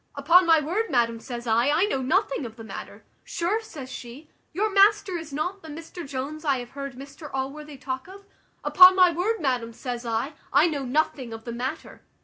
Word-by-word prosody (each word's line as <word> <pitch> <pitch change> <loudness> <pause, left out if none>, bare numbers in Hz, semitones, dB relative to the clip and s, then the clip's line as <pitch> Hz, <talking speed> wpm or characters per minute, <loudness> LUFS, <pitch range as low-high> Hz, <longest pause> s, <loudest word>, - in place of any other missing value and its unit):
`Upon 340 +6 +5
my 325 -1 +6
word, 365 +10 -2
madam,' 230 -2 +1
says 240 0 -7
I, 235 +3 +2
`I 330 +7 +3
know 270 -10 -1
nothing 265 +2 0
of 225 -3 -7
the 225 - -10
matter.' 220 - -9 0.2
`Sure,' 380 +7 -1
says 300 -12 -10
she, 255 +6 -10 0.2
`your 420 +2 0
master 400 -1 +4
is 325 -3 -6
not 360 +7 -3
the 320 - -12
Mr 325 +1 -8
Jones 285 +4 -5
I 280 -4 +2
have 245 -1 -8
heard 275 -2 -7
Mr 280 +3 -10
Allworthy 280 +2 -5
talk 260 +2 -5
of?' 395 +1 -13 0.4
`Upon 370 0 +8
my 365 -2 +6
word, 385 +7 -1
madam,' 250 -6 -1
says 245 0 -5
I, 230 +5 -2 0.2
`I 305 +5 +4
know 280 -3 -3
nothing 260 -3 -1
of 225 0 -9
the 235 - -5
matter.' 260 +7 -5
285 Hz, 200 wpm, -25 LUFS, 255-340 Hz, 0.4 s, `Upon